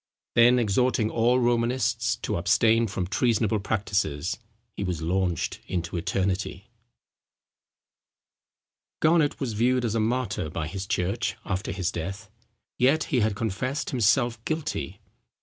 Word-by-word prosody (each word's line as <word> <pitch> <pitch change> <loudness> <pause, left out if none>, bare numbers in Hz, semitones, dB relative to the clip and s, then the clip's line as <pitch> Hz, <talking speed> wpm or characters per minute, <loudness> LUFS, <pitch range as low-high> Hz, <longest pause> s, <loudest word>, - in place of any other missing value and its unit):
Then 120 +1 +6
exhorting 115 0 +1
all 120 +2 +3
Romanists 120 -1 +1
to - - -1
abstain 115 +6 +3
from 95 -2 -3
treasonable 110 +1 +1
practices, 95 -6 -1 0.4
he - - -3
was 90 -4 -3
launched 90 -1 -1
into 85 -1 -3
eternity. 95 +3 -2 2.3
Garnet 155 -2 +3
was 130 -5 -2
viewed 125 +3 +2
as 110 - -1
a 115 - +1
martyr 110 -6 -1
by 80 -1 -3
his 95 +4 -5
church 100 +7 -1
after 95 0 -2
his 90 -1 -1
death. 90 +4 -6 0.5
Yet 140 +5 +4
he 125 - +4
had 110 -2 +1
confessed 120 +8 -2
himself 120 -1 +2
guilty. 155 - -3
110 Hz, 125 wpm, -26 LUFS, 95-120 Hz, 2.3 s, Then